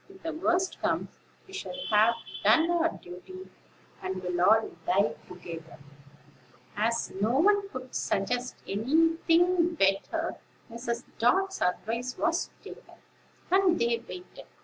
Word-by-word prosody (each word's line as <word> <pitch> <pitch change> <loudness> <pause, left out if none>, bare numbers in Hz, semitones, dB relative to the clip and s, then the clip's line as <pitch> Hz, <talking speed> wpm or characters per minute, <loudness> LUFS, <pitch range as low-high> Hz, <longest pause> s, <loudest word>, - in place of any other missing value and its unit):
If 385 0 -16
the 325 0 -3
worst 355 +3 0
comes, - - 0 0.4
we 385 - -16
shall 385 -8 -5
have 215 +2 +5 0.3
done 325 +2 +5
our 335 -1 +3
duty, 350 - -11 0.5
and 185 0 -4
will 180 -1 -1
all 220 +4 +4 0.2
die 185 -6 +3
together." 170 -3 -9 1.0
As 230 +2 0
no 230 +5 +2
one 400 +4 +3
could 255 -3 -8
suggest 245 +6 -1
any 315 +11 +2
thing 345 0 +4
better, 305 - 0 0.3
Mrs. 235 +1 -3 0.2
Dart's 385 +12 +2
advice 235 +7 -1
was 330 +1 0
taken, - - -12 0.6
and 375 -2 +4
they 235 0 +1
waited. 360 0 -10
255 Hz, 125 wpm, -28 LUFS, 210-345 Hz, 1.0 s, have